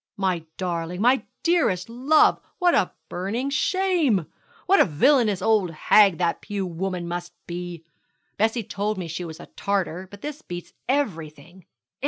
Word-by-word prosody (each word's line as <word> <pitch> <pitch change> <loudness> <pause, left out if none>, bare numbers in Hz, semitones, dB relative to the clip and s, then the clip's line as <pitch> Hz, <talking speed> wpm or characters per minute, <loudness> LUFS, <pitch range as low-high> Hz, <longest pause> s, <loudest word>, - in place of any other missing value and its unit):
'My 185 -4 -1
darling, 175 -1 -3
my 250 +5 +3 0.2
dearest 325 - +2
love, 260 +7 +3 0.2
what 355 -3 +3
a 180 - +2 0.2
burning 220 +10 -3
shame! 320 - +2 0.4
What 390 +2 +5
a - - +7
villainous 210 - +3
old 215 -5 +3
hag 190 +3 +4
that 170 -2 0
Pew 200 -2 -3
woman 180 0 -3
must 175 0 -5
be! 175 -1 -6 0.5
Bessie 225 +2 +1
told 210 +1 -2
me 180 -2 -4
she 165 +2 -5
was 160 -1 -8
a - - -9
Tartar, 190 -2 -2
but 205 +1 -13
this 295 0 -5
beats 175 0 -8 0.2
everything. 175 - -3
190 Hz, 150 wpm, -24 LUFS, 175-245 Hz, 0.5 s, a